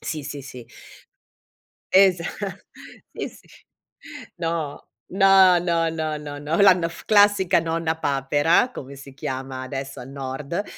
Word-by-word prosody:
Sì, 155 -2 -5
sì, 145 -1 -7
sì. 125 -3 -11 1.3
Esa 185 -3 +5 0.9
sì, - - -5
sì. - - -19 0.9
No, 165 -4 -4 0.2
no, 190 -1 +6
no, 170 -1 0
no, 155 -1 -3
no, 145 +2 -4
la 195 -1 +8
n 175 -2 -1
f 170 - -12
classica 205 -4 +4
Nonna 165 0 -2
Papera, 145 - +2
come 140 - -9
si 135 0 -13
chiama 130 -1 -5
adesso 135 0 -6
al 125 - -10
nord, 140 +6 -4
160 Hz, 130 wpm, -23 LUFS, 140-175 Hz, 1.3 s, la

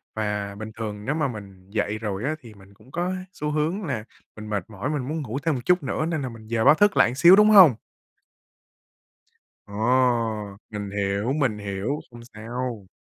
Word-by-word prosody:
Và 105 -2 -2
bình 110 +1 -7
thường 105 -2 -5
nếu 150 +3 -1
mà 150 -3 +1
mình 100 -5 -10
dậy 105 0 -1
rồi 105 -1 -4
á, 155 +3 -1
thì 115 -4 -13
mình 100 0 -18
cũng 125 +6 -20
có 175 +4 -1 0.2
xu 150 0 -3
hướng 160 +7 -1
là 125 -8 -3 0.3
mình 105 0 -9
mệt 100 -3 -3
mỏi, 110 +6 -4
mình 140 -4 -2
muốn 155 +1 -3
ngủ 130 +1 -4
thêm 160 -3 +1
một 125 - -4
chút 180 -2 +3
nữa 140 +3 -1
nên 160 -3 -2
là 130 - -3
mình 115 -2 -12
dời 115 0 0
báo 150 - +8
thức 205 +3 +3
lại - - +6
một - - -5
xíu, 175 +4 +8
đúng 210 +1 +6
hông? 185 - +8 1.9
Ồ, 100 - -14 1.0
mình 105 -2 -5
hiểu, 100 +4 -1
mình 130 -8 0
hiểu. 100 +8 -3
Không 120 0 -12
sao. 115 -1 -5
115 Hz, 205 wpm, -24 LUFS, 105-150 Hz, 1.9 s, báo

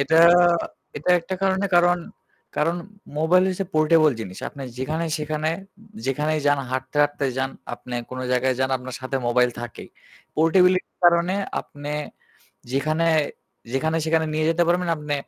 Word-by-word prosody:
এটা 150 +4 +2 0.8
এটা 150 +5 -1
একটা 185 +3 -4
কারণে 190 +1 +2
কারণ 175 0 +4 0.6
কারণ 165 +3 +1 0.4
মোবাইল 175 +4 +4
হচ্ছে 190 +1 -2
পোর্টেবল 155 0 +5
জিনিস। 95 -3 -7
আপনি 140 - -10 0.2
যেখানে-সেখানে 155 +1 -2 0.6
যেখানেই 150 +3 0
যান 145 0 +4
হাঁটতে, 130 +2 -4
হাঁটতে 145 -1 -1
যান, 135 0 0 0.2
আপনে 125 - -9 0.2
কোন 130 - -6
জায়গায় 130 +1 +2
যান 130 0 +1
আপনার 130 0 -8
সাথে 130 +1 -3
মোবাইল 125 +1 +3
থাকেই। 120 0 -8 0.5
পোর্টেবিলিটি 180 +3 +4
এর - - -53
কারণে 175 +2 +4 0.3
আপনে 145 +1 -8 0.8
যেখানে 155 +4 +1 0.7
যেখানে-সেখানে 160 +3 +1
নিয়ে 155 0 +1
যেতে 165 +1 +2
পারবেন 175 0 +1
আপনি 150 -1 -3
155 Hz, 135 wpm, -23 LUFS, 135-170 Hz, 0.8 s, পোর্টেবল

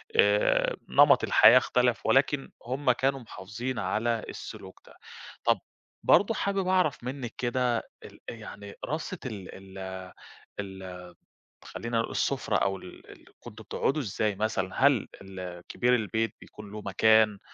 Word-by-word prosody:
آآ - - +3
نمط - - +6
الحياة - - +7
اختلف 125 -1 +2
ولكن 135 +1 +2
هُم 130 +2 +1
كانوا 135 +2 0
محافظين 115 +1 -6
على 110 +4 0
السلوك - - -9
ده. - - -16 0.5
طَب - - +3 0.4
برضه 205 +3 +5
حابب 195 -3 -1
أعرف 185 -9 +2
منِّك 125 -2 -5
كده 125 -1 0 0.3
ال - - -13
أ - - -5
يعني 105 -2 -10
رصة 160 +4 -4
ال 105 -7 -6 0.3
ال 95 -1 -7 0.5
ال 95 -2 -7 0.6
خلّينا 115 0 -3
نقول 115 - -2
السفرة - - 0
أو 95 0 0
ال 90 - -13
ال - - -16
كنتم 110 +1 -11
بتقعدوا 140 +7 -1
إزاي 105 -3 -1
مثلًا؟ 105 +3 +1
هل 130 -8 +2
ال 95 -2 -8
كبير 125 0 +2
البيت 110 -1 -1
بيكون 105 -1 -12
له 105 0 -7
مكان 105 +1 +4
115 Hz, 140 wpm, -28 LUFS, 100-135 Hz, 0.6 s, الحياة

